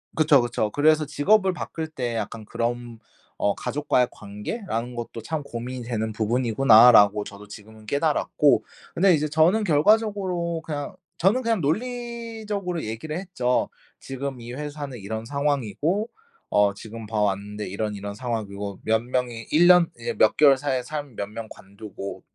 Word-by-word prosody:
그쵸, 155 Hz, -4 st, +5 dB
그쵸. 120 Hz, -3 st, -1 dB
그래서 155 Hz, +3 st, +3 dB
직업을 190 Hz, +7 st, +2 dB
바꿀 160 Hz, -2 st, -5 dB
때 125 Hz, -6 st, -4 dB
약간 110 Hz, 0 st, -4 dB
그런 120 Hz, 0 st, -3 dB, 0.4 s
어 100 Hz, -, +1 dB
'가족과의 140 Hz, -4 st, 0 dB
관계라는 115 Hz, -, -5 dB
것도 115 Hz, -1 st, -6 dB
참 155 Hz, +5 st, -3 dB
고민이 125 Hz, 0 st, -6 dB
되는 110 Hz, -2 st, -2 dB
부분이구나.'라고 110 Hz, -2 st, +5 dB
저도 105 Hz, 0 st, -11 dB
지금은 110 Hz, +1 st, -13 dB
깨달았고 145 Hz, +1 st, +2 dB, 0.3 s
근데 185 Hz, +1 st, +4 dB
이제 155 Hz, -1 st, +1 dB
저는 165 Hz, +8 st, +3 dB
결과적으로 185 Hz, -1 st, +1 dB
그냥 145 Hz, -3 st, -5 dB, 0.2 s
저는 200 Hz, +9 st, +3 dB
그냥 230 Hz, -5 st, 0 dB
논리적으로 220 Hz, -, -3 dB
얘기를 115 Hz, +9 st, -5 dB
했죠. 125 Hz, -10 st, -1 dB, 0.3 s
"지금 135 Hz, -1 st, -6 dB
이 120 Hz, +1 st, -8 dB
회사는 145 Hz, -1 st, -6 dB
이런 110 Hz, +3 st, -5 dB
상황이고 145 Hz, -, -1 dB, 0.4 s
어 100 Hz, -1 st, +3 dB
지금 110 Hz, +2 st, -9 dB
봐 110 Hz, 0 st, -1 dB
왔는데 105 Hz, +1 st, -2 dB
이런, 105 Hz, +2 st, -3 dB
이런 100 Hz, 0 st, -6 dB
상황이고 105 Hz, -4 st, -4 dB
몇 110 Hz, 0 st, +2 dB
명이 120 Hz, -2 st, -3 dB
1 170 Hz, +3 st, +5 dB
년 180 Hz, -2 st, +6 dB
이제 115 Hz, -, -4 dB
몇 110 Hz, -, +4 dB
개월 140 Hz, -3 st, +6 dB
사이에 130 Hz, -2 st, -1 dB
사람이 145 Hz, -3 st, -6 dB
몇 100 Hz, -, -3 dB
명 110 Hz, +1 st, -7 dB
관두고 100 Hz, 0 st, -9 dB
125 Hz, 335 characters per minute, -24 LUFS, 110-160 Hz, 0.4 s, 년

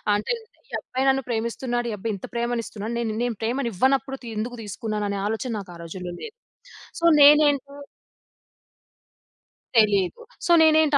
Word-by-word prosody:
అంటే, 210 Hz, -, -2 dB
ఇంతే 445 Hz, 0 st, -22 dB
ఈ -, -, -24 dB
అబ్బాయి 260 Hz, +1 st, -2 dB
నన్ను 270 Hz, 0 st, +2 dB
ప్రేమిస్తున్నాడు, 240 Hz, +1 st, -2 dB
ఈ -, -, -3 dB
అబ్బాయింత 205 Hz, -1 st, -4 dB
ప్రేమనిస్తున్నాడు, 235 Hz, -2 st, -3 dB
నేనిన్నేం 235 Hz, +1 st, -1 dB
ప్రేమనివ్వనప్పుడు 260 Hz, +3 st, 0 dB
తి 235 Hz, -, -7 dB
ఎందుకు 240 Hz, +3 st, -3 dB
తీసుకున్నాననే 210 Hz, -1 st, -3 dB
ఆలోచన 225 Hz, +3 st, -2 dB
నాకా 180 Hz, -3 st, -10 dB
రోజుల్లో 175 Hz, +1 st, -6 dB
లేదు. 460 Hz, +1 st, -8 dB, 0.7 s
సో, 335 Hz, -, -4 dB, 0.2 s
నేనేంటో 285 Hz, -1 st, +5 dB, 2.0 s
తెలీదు. 200 Hz, -5 st, +3 dB, 0.2 s
సో, 345 Hz, -, +1 dB
నేనేంటి 315 Hz, -2 st, +5 dB
235 Hz, 125 wpm, -24 LUFS, 215-270 Hz, 2.0 s, నేనేంటో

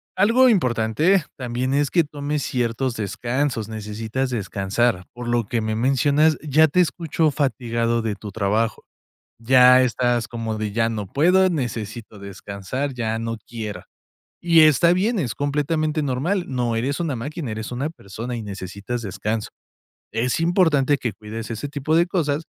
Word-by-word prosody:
algo 230 Hz, +7 st, +5 dB
importante 150 Hz, -, +2 dB
también 125 Hz, +1 st, -2 dB
es 145 Hz, 0 st, +2 dB
que 170 Hz, -, +3 dB
tomes 145 Hz, -1 st, -3 dB
ciertos 120 Hz, 0 st, -1 dB
descansos, 120 Hz, +2 st, -2 dB
necesitas 110 Hz, +4 st, -3 dB
descansar. 100 Hz, -2 st, -1 dB
Por 120 Hz, 0 st, -7 dB
lo 120 Hz, -2 st, 0 dB
que 115 Hz, +1 st, -1 dB
me 110 Hz, 0 st, -2 dB
mencionas, 140 Hz, +6 st, +3 dB
ya 155 Hz, +2 st, +4 dB
te 170 Hz, +5 st, +1 dB
escucho 160 Hz, -1 st, +1 dB
fatigado 115 Hz, -5 st, 0 dB
de 110 Hz, -2 st, -1 dB
tu 105 Hz, 0 st, -8 dB
trabajo, 110 Hz, +2 st, 0 dB, 0.6 s
ya 125 Hz, +2 st, +6 dB
estás 120 Hz, -1 st, +1 dB
como 115 Hz, -2 st, -4 dB
de: 105 Hz, -2 st, -3 dB
"Ya 115 Hz, +1 st, +1 dB
no 105 Hz, -3 st, -4 dB
puedo, 180 Hz, -, +4 dB
necesito 115 Hz, -, -4 dB
descansar, 100 Hz, +7 st, -5 dB
ya 110 Hz, -3 st, -2 dB
no 115 Hz, 0 st, -3 dB
quiera". 105 Hz, -6 st, -6 dB, 0.6 s
Y 170 Hz, -1 st, +5 dB
está 155 Hz, +2 st, +6 dB
bien, 205 Hz, +6 st, +1 dB
es 125 Hz, -10 st, -2 dB
completamente 150 Hz, +2 st, 0 dB
normal, 150 Hz, +8 st, -1 dB
no 120 Hz, -3 st, -1 dB
eres 135 Hz, +7 st, -1 dB
una 155 Hz, -6 st, -1 dB
máquina, 140 Hz, +3 st, -5 dB
eres 110 Hz, +2 st, -5 dB
una 130 Hz, +5 st, -2 dB
persona 120 Hz, -4 st, -7 dB
y 115 Hz, -, -5 dB
necesitas 100 Hz, +3 st, -5 dB
descanso. 105 Hz, +1 st, -3 dB, 0.6 s
Es 120 Hz, +6 st, 0 dB
importante 160 Hz, -5 st, +3 dB
que 120 Hz, -5 st, -3 dB
cuides 110 Hz, +3 st, -7 dB
ese 115 Hz, +5 st, -4 dB
tipo 145 Hz, +2 st, -1 dB
de 170 Hz, +2 st, +4 dB
cosas, 160 Hz, -4 st, -1 dB
125 Hz, 155 wpm, -22 LUFS, 110-150 Hz, 0.6 s, ya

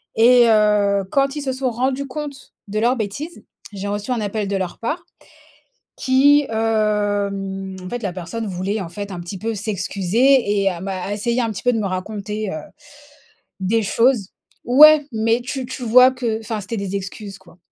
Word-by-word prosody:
et 240 Hz, +2 st, +6 dB
heu, 210 Hz, -2 st, +3 dB
quand 275 Hz, 0 st, +1 dB
ils 295 Hz, -, -3 dB
se 270 Hz, -2 st, -2 dB
sont 260 Hz, -1 st, -1 dB
rendus 260 Hz, +4 st, -1 dB
compte 280 Hz, 0 st, -7 dB
de 205 Hz, +1 st, -4 dB
leur 240 Hz, +3 st, +2 dB
bêtise, 260 Hz, -, -5 dB, 0.3 s
j'ai 200 Hz, 0 st, -5 dB
reçu 205 Hz, +4 st, -3 dB
un 240 Hz, -3 st, 0 dB
appel 210 Hz, 0 st, -2 dB
de 200 Hz, -, -2 dB
leur 185 Hz, -2 st, -4 dB
part 310 Hz, +9 st, -3 dB, 0.9 s
qui 285 Hz, +2 st, +4 dB
hem, 205 Hz, -3 st, -1 dB
en -, -, -6 dB
fait 245 Hz, -1 st, -4 dB
la 195 Hz, -4 st, -2 dB
personne 185 Hz, +6 st, -5 dB
voulait, 195 Hz, +3 st, -2 dB
en 185 Hz, -, -5 dB
fait, 200 Hz, +2 st, -6 dB
un 175 Hz, -, -6 dB
petit 175 Hz, +3 st, -7 dB
peu 225 Hz, +3 st, -3 dB
s'excuser 205 Hz, +3 st, +1 dB
et 195 Hz, -, +3 dB
à 175 Hz, -2 st, -6 dB
m'a 190 Hz, +1 st, -4 dB
essayé 235 Hz, +4 st, -1 dB
un 230 Hz, -2 st, 0 dB
petit 195 Hz, -, -7 dB
peu 245 Hz, -, +3 dB
de 225 Hz, -, 0 dB
me 210 Hz, -, -1 dB
raconter, 205 Hz, +2 st, -4 dB
heu, -, -, -4 dB, 1.1 s
des 215 Hz, +5 st, +1 dB
choses 230 Hz, -1 st, +2 dB, 0.4 s
ouais, 295 Hz, +3 st, +7 dB
mais 225 Hz, +1 st, +1 dB
tu 255 Hz, +1 st, -4 dB
tu 260 Hz, +1 st, -7 dB
vois 250 Hz, +3 st, +6 dB
que 235 Hz, -4 st, -2 dB
enfin 220 Hz, -1 st, -4 dB
c'étaient 215 Hz, +4 st, -5 dB
des 200 Hz, -1 st, -3 dB
excuses 195 Hz, +1 st, -6 dB
quoi. 180 Hz, -2 st, -20 dB
215 Hz, 185 wpm, -20 LUFS, 195-250 Hz, 1.1 s, ouais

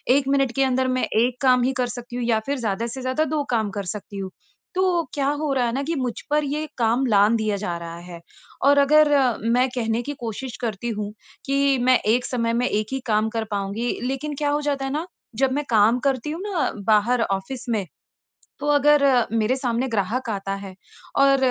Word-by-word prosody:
1 275 Hz, -1 st, +1 dB
minute 275 Hz, -2 st, +2 dB
के 270 Hz, -, +3 dB
अंदर 260 Hz, 0 st, +1 dB
मैं 255 Hz, -, 0 dB, 0.2 s
एक 250 Hz, +1 st, 0 dB
काम 255 Hz, -2 st, +4 dB
ही 255 Hz, -, +2 dB
कर 250 Hz, -1 st, +1 dB
सकती 245 Hz, 0 st, -8 dB
हूँ 245 Hz, -, -2 dB
या 230 Hz, -2 st, +2 dB
फिर 285 Hz, -, 0 dB
ज़्यादा 220 Hz, +3 st, -1 dB
से 265 Hz, -, -6 dB
ज़्यादा 255 Hz, +4 st, 0 dB
2 295 Hz, -, 0 dB
काम 220 Hz, -3 st, +1 dB
कर 200 Hz, -, -2 dB
सकती 205 Hz, 0 st, -8 dB
हूँ। 190 Hz, -1 st, -4 dB, 0.5 s
तो 370 Hz, -, +2 dB, 0.3 s
क्या 275 Hz, -2 st, 0 dB, 0.2 s
हो 295 Hz, -, 0 dB
रहा 255 Hz, -2 st, +1 dB
है 235 Hz, -, 0 dB
ना 275 Hz, +2 st, -1 dB
कि 330 Hz, +4 st, -2 dB
मुझ 255 Hz, -4 st, -1 dB, 0.2 s
पर 300 Hz, 0 st, +2 dB
यह 300 Hz, +2 st, -2 dB
काम 240 Hz, +2 st, +2 dB
लाँघ 205 Hz, -1 st, +4 dB
दिया 215 Hz, -2 st, 0 dB
जा 175 Hz, -4 st, -2 dB
रहा 170 Hz, 0 st, -7 dB
है। 170 Hz, -, -8 dB, 0.5 s
और 285 Hz, -, +6 dB
अगर 300 Hz, +2 st, +5 dB, 0.5 s
मैं 255 Hz, +1 st, +3 dB
कहने 225 Hz, -1 st, 0 dB
की -, -, -2 dB
कोशिश 235 Hz, +2 st, -5 dB
करती 230 Hz, 0 st, -3 dB
हूँ 210 Hz, 0 st, -4 dB, 0.3 s
कि 275 Hz, 0 st, +2 dB
मैं 255 Hz, -, +6 dB, 0.2 s
1 245 Hz, -, -1 dB
समय 230 Hz, -2 st, -1 dB
में 250 Hz, -, +1 dB
1 215 Hz, 0 st, -1 dB
ही 265 Hz, -, -1 dB
काम 215 Hz, 0 st, +2 dB
कर 225 Hz, -, 0 dB
पाऊँगी, 200 Hz, +5 st, -2 dB
लेकिन 270 Hz, +3 st, -3 dB
क्या 290 Hz, -, +2 dB
हो 295 Hz, +1 st, 0 dB
जाता 275 Hz, -2 st, 0 dB
है 270 Hz, -, -3 dB
ना, 310 Hz, +4 st, -2 dB, 0.3 s
जब 265 Hz, +3 st, +2 dB
मैं 290 Hz, +2 st, -1 dB
काम 225 Hz, +2 st, +4 dB
करती 265 Hz, +1 st, -1 dB
हूँ 330 Hz, -, -5 dB
ना 390 Hz, -6 st, -1 dB, 0.2 s
बाहर 225 Hz, +3 st, +3 dB
ऑफ़िस 200 Hz, +5 st, -3 dB
में, 215 Hz, -4 st, 0 dB, 0.7 s
तो 290 Hz, -, -4 dB
अगर 295 Hz, 0 st, +4 dB, 0.3 s
मेरे 230 Hz, +3 st, +1 dB
सामने 250 Hz, 0 st, -1 dB
ग्राहक 230 Hz, +3 st, -1 dB
आता 195 Hz, -2 st, -3 dB
है 190 Hz, -1 st, -10 dB, 0.5 s
और 275 Hz, 0 st, +5 dB
250 Hz, 220 wpm, -23 LUFS, 220-275 Hz, 0.7 s, और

